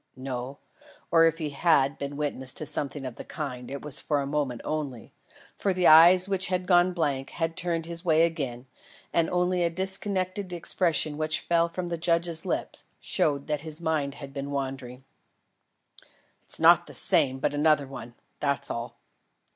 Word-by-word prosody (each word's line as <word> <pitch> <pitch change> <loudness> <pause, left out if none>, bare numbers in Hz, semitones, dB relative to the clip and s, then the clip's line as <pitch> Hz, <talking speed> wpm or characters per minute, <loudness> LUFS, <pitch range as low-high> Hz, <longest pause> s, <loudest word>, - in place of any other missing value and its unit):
No, 130 +1 -5 0.5
or 165 -1 +6
if 165 0 +2
he 155 -3 -4
had 140 -2 +2
been 140 0 -5
witness 135 -3 -3
to 155 - 0
something 145 -1 -4
of 125 -2 -7
the - - -7
kind, 130 -8 -6
it 140 0 -6
was 150 -2 -3
for 145 -2 -1
a 140 - -2
moment 140 -4 -2
only; 145 -6 -4 0.4
for 195 - 0
the 180 -1 0
eyes 175 +4 +8
which 195 -2 0
had 180 0 -1
gone 180 0 +4
blank 145 -6 -2
had 165 -1 -3
turned 170 -2 -1
his 170 0 -7
way 160 -2 +4
again, 135 -7 -4 0.5
and 165 -1 +2
only 180 0 +1
a 170 - +2
disconnected 190 +1 -2
expression 165 -3 0
which 155 0 -1
fell 170 0 +1
from 175 +1 -5
the 170 -1 -3
judge's 170 -1 0
lips, - - -4
showed 140 -2 0
that 150 -2 -2
his 155 0 -4
mind 155 -4 -1
had 140 -2 -10
been 140 0 -5
wandering. 135 -2 -5 1.4
"It's - - +4
not - - +6
the - - -6
same 130 0 +3
but 130 - -1
another 150 -1 +3
one; 125 -3 -10 0.2
that's 140 -1 -1
all." 115 +1 -5
155 Hz, 175 wpm, -27 LUFS, 140-170 Hz, 1.4 s, eyes